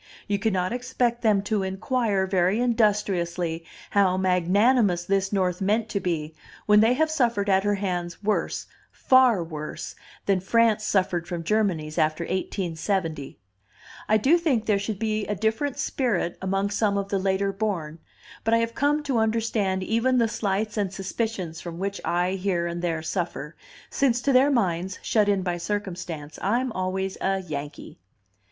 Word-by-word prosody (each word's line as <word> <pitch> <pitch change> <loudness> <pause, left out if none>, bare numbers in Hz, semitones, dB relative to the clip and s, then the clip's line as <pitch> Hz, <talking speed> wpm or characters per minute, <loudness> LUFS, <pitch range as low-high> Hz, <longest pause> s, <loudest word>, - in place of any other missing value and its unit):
You 200 -1 0
cannot 190 -2 0
expect 245 -1 -1
them 210 -4 +3
to 205 0 0
inquire 195 +1 0
very 190 +2 +1
industriously 190 -8 0 0.3
how 190 -2 +3
magnanimous 190 +2 +3
this 195 0 0
North 185 -2 0
meant 215 +3 +1
to 200 - -1
be, 160 -4 -2 0.3
when 210 0 +6
they 225 +3 +5
have 315 +4 +1
suffered 235 -9 +1
at 190 0 +3
her 205 0 +1
hands 180 -2 -3
worse, 210 +1 -1 0.3
far 255 -8 +4
worse, 155 -2 -6 0.3
than 195 -2 +2
France 220 +2 +2
suffered 185 -4 0
from 175 -2 -4
Germany's 165 -6 0
after 155 +2 +1
1870. 170 -4 -2 0.7
"I 215 - +5
do 290 +11 +4
think 265 -10 +1
there 205 -2 +2
should 200 +1 -3
be 215 0 -1
a 210 - -1
different 220 +7 -1
spirit 210 -10 -1
among 195 +1 -1
some 205 -1 +1
of 200 0 -2
the 195 - 0
later 195 +1 0
born, 180 -7 -3 0.4
but 225 +1 +3
I - - +4
have 230 0 -1
come 290 +4 +1
to 270 -5 0
understand 220 -4 0
even 230 +5 +1
the 230 -2 +3
slights 215 0 -2
and 200 -3 0
suspicions 195 -4 -4
from 170 -1 -7
which 195 +2 -3
I 175 +1 +1
here 190 -2 -1
and 170 0 -3
there 165 -2 -2
suffer, 170 -2 -3 0.4
since 250 -4 +2
to 275 - +2
their 260 +3 +5
minds, 185 -7 0
shut 210 -2 +2
in 195 -2 +1
by 175 -1 -1
circumstance, 175 -6 -5
I'm 240 +6 0
always 190 0 -3
a 195 0 0
'Yankee. 145 -3 -7
195 Hz, 160 wpm, -25 LUFS, 180-220 Hz, 0.7 s, when